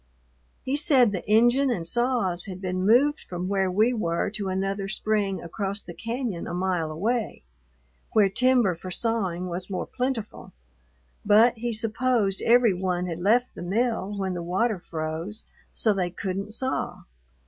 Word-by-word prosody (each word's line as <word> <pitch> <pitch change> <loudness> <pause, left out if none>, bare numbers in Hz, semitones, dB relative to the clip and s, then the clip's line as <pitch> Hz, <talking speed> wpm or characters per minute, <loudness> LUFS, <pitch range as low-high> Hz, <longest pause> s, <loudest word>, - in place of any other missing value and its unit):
He 265 - -1
said 270 -6 +5
the 185 -3 -4
engine 240 +5 +4
and 180 -9 -2
saws 235 -5 0
had 185 -2 -7
been 185 0 -2
moved 280 +7 +4
from 180 0 -4
where 195 -1 +1
we 215 +7 +2
were 170 -6 -1
to 205 -2 -4
another 195 +1 -2
spring 200 -2 -1
across 195 +4 -3
the 175 - -9
cañon 230 -4 -4
a - - -4
mile 180 -3 -1
away, 215 +9 -2 0.7
where 210 -2 +4
timber 245 -1 +3
for 175 +2 -9
sawing 185 -4 -1
was 180 +1 -4
more 190 - -3
plentiful, 250 -4 -4 0.7
but 220 +4 +5
he 240 +1 -2
supposed 225 -2 0
every 235 -3 +4
one 180 -1 -1
had 170 -2 -4
left 230 +7 +2
the - - -9
mill 210 +1 -1
when 190 -1 -2
the 175 - -4
water 190 +5 0
froze 165 +5 -5 0.3
so 220 - +2
they 185 -3 -1
couldn't 195 +3 -4
saw. 260 +2 -2
200 Hz, 160 wpm, -25 LUFS, 185-235 Hz, 0.7 s, said